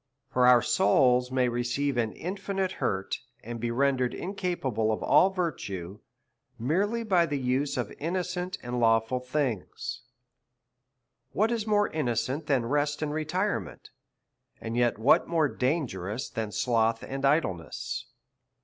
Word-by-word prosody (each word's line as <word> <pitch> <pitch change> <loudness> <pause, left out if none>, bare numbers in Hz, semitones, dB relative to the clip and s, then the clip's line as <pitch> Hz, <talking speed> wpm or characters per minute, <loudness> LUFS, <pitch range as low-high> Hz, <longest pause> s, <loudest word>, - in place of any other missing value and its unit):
For 125 0 +4
our 125 -1 +7
souls 125 +4 +3
may 130 -1 +2
receive 120 +3 -1
an 115 -3 0
infinite 195 +1 -3
hurt, 95 0 -1 0.2
and 115 +1 -6
be 120 +1 -2
rendered 130 0 +1
incapable 170 - -1
of 110 - -2
all 150 +6 +5
virtue, 105 - -4 0.6
merely 200 - 0
by 180 -6 +3
the 145 -2 -1
use 135 +2 0
of - - -3
innocent 180 +3 -2
andlav»ful 120 0 +2
things. 125 -1 -3 1.3
What 220 +3 +2
is 225 -2 -2
more 205 -1 +3
innocent 140 +1 -2
than 130 -5 +2
rest 145 +4 0
and 150 -1 -2
retirement, 155 - -2 0.7
and 115 +1 -5
yet 120 -2 +2
what 110 +6 +4
more 165 -3 +2
dangerous 125 - -2
than 110 -2 -3
sloth 115 +1 +1
and 135 0 -5
idleness? 135 - -1
130 Hz, 130 wpm, -28 LUFS, 115-165 Hz, 1.3 s, our